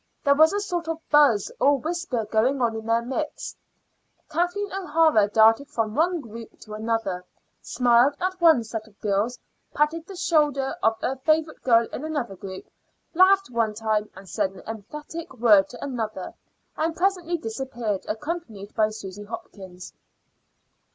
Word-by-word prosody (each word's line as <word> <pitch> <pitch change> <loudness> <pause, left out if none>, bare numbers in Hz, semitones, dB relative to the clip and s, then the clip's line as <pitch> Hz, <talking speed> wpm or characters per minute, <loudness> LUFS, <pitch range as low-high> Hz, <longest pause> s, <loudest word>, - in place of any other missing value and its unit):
There 280 - +5
was 315 +3 +5
a 405 - 0
sort 350 -5 -3
of 325 0 -3
buzz 290 -9 +4
or 285 +1 +4
whisper 310 -6 -3
going 230 +6 +1
on 235 -2 +1
in 220 0 -6
their 230 +1 +2
midst. 290 +5 -4 0.7
Kathleen 355 +5 -1
O'Hara 320 - +3
darted 225 +5 +4
from 220 -5 -2
one 340 +4 +1
group 230 -2 -11
to 215 - -10
another, 215 -4 -2 0.4
smiled 245 +3 +3
at 370 0 -2
one 320 -8 +6
set 225 0 -6
of 205 -2 -23
girls, 210 +4 0 0.4
patted 320 +3 0
the 390 - -9
shoulder 295 -6 +1
of 225 0 +2
a 265 - -1
favorite 310 +3 0
girl 230 -2 +4
in 265 - -5
another 290 -10 -3
group, 190 0 -8 0.5
laughed 380 -2 +4
one 225 -3 0
time, 215 -1 -1 0.2
said 195 0 -2
an 185 - -13
emphatic 295 +9 -7
word 210 -5 +5
to 245 - -9
another, 225 -8 -4 0.4
and 320 +1 -1
presently 350 -2 0
disappeared, 230 - -4
accompanied 220 - -5
by 215 -1 +2
Susy 205 -1 -8
Hopkins. 190 -4 -9
245 Hz, 150 wpm, -25 LUFS, 220-315 Hz, 0.7 s, one